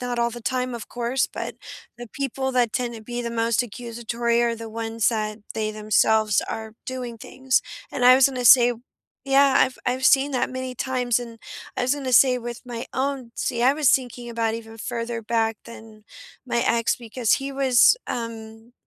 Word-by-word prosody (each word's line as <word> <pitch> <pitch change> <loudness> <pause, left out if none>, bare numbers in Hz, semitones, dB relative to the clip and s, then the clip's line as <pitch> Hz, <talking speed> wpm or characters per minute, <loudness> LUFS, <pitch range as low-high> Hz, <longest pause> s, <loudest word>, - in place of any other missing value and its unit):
not 245 -1 -3
all 235 0 +1
the 240 0 -9
time, 255 0 -2
of 235 - -7
course, 245 +2 -1
but - - -6 0.4
the 240 0 -8
people 265 -1 -3
that 245 -3 +2
tend 240 -2 -2
to 220 - -9
be 240 +2 -5
the 235 - -4
most 230 +1 +1
accusatory 235 0 -2
are 235 -1 +1
the 230 0 -8
ones 225 0 -1
that 215 -2 -2 0.2
they 215 -1 -1
themselves 215 0 +2
are 220 0 -6
doing 250 -2 -5
things, 260 +1 -1 0.3
and 245 - -2
I 250 +1 +9
was 265 0 +6
gonna 250 -2 -4
say 245 +1 +7 0.5
Yeah, 275 0 +4
I've 255 - +2
I've 255 +1 -1
seen 275 +1 +4
that 255 - 0
many 255 0 -5
times, 250 -2 0
and 235 -2 -9 0.4
I - - -1
was 255 +2 +2
gonna 265 -3 -4
say 250 +1 +6
with 240 -1 -7
my 235 -1 -6
own 260 -3 -2
See, 235 0 -2
I 260 +2 +5
was 295 -3 +3
thinking 245 -2 -1
about 230 -1 -1
even 225 -1 -9
further 230 0 -4
back 225 0 0
than 220 -2 -13 0.4
my 240 - 0
ex 230 0 +2
because 235 -1 -1
he 275 +1 -4
was, 270 - +4
um 225 0 -7
240 Hz, 190 wpm, -23 LUFS, 230-255 Hz, 0.5 s, I